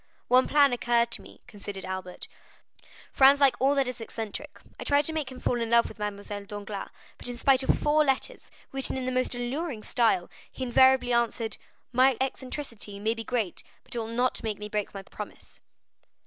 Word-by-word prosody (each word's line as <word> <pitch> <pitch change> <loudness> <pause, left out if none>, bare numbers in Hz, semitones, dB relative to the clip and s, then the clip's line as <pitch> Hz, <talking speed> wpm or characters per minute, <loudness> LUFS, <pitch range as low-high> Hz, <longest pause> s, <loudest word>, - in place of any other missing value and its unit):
"One 255 +1 +5
plan 285 -3 +5
occurred 235 -1 +2
to - - -3
me," - - -15
continued 205 -4 -7
Albert; 185 -1 -6 0.9
"Franz 275 +1 +7
likes 275 -2 +5
all 275 +2 +3
that 275 -2 +2
is 250 -2 -5
eccentric; 225 -2 -6 0.2
I - - -4
tried 285 0 +3
to 320 - +1
make 300 -4 -2
him 255 - -9
fall 240 -1 0
in 230 - -2
love 235 0 +5
with - - -12
Mademoiselle 205 0 -5
Danglars; 205 -1 -6 0.3
but - - -3
in 245 - -5
spite 265 +2 +4
of 265 - +2
four 300 +1 +3
letters, 295 - -1 0.2
written 270 0 -1
in 260 - -3
the 255 - -1
most 255 0 0
alluring 245 0 -3
style, 220 -7 +2 0.2
he 260 - -6
invariably 260 0 +4
answered: 230 -2 0 0.3
'My 255 0 +4
eccentricity 255 -6 -4
may 220 +2 +1
be 225 0 -6
great, 220 -5 -2 0.2
but - - -13
it 240 - -2
will 225 - -3
not 245 +3 0
make 215 -2 -3
me 210 - -6
break 210 -1 -2
my 195 -1 -8
promise. 210 +2 -10
240 Hz, 195 wpm, -28 LUFS, 215-265 Hz, 0.9 s, Franz